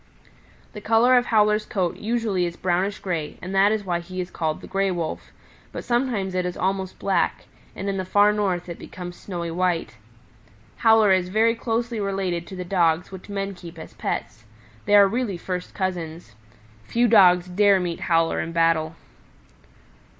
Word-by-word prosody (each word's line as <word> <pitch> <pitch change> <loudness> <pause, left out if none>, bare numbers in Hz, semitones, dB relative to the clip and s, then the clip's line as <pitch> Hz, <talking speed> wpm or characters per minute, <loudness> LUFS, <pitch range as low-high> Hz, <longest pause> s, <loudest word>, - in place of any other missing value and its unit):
"The 210 - -8
color 230 +4 +4
of 245 -1 +3
Howler's 210 -1 +3
coat 185 -4 -1
usually 215 -5 -1
is 170 - -7
brownish 185 +2 0
gray 165 -6 -4
and 185 +2 -7
that 195 +2 +4
is 215 -2 -1
why 175 -2 -1
he 185 +2 -8
is 180 0 -4
called 155 -1 -2
the - - -10
Gray 195 0 0
Wolf; 170 -3 -4 0.4
but - - -6
sometimes 240 -6 -1
it 185 0 0
is 180 0 -4
almost 190 0 -2
black, 190 -3 0 0.3
and 195 - -5
in 195 -1 -1
the 190 - -2
Far 205 +3 +4
North 190 -4 -1
it 170 - -7
becomes 175 -1 -8
snowy 170 -3 -5
white. 165 -9 -1 0.8
Howler 220 -3 +5
is 185 -1 +2
very 220 +4 +3
closely 230 0 -2
related 190 -4 -2
to 190 - -8
the 180 -1 -5
Dogs 175 -1 +1
which 190 +1 -10
men 200 0 -3
keep 175 -2 -11
as 160 - -10
pets. - - -4 0.4
They 205 - +5
are 200 -1 +8
really 220 -3 -2
first 180 +1 -5
cousins. 170 - -4 0.5
Few 235 - +1
Dogs 180 -5 +5
dare 200 +1 +4
meet 175 -2 -3
Howler 165 -1 +2
in 165 - -3
battle." 165 -1 +1
185 Hz, 175 wpm, -23 LUFS, 175-205 Hz, 0.8 s, are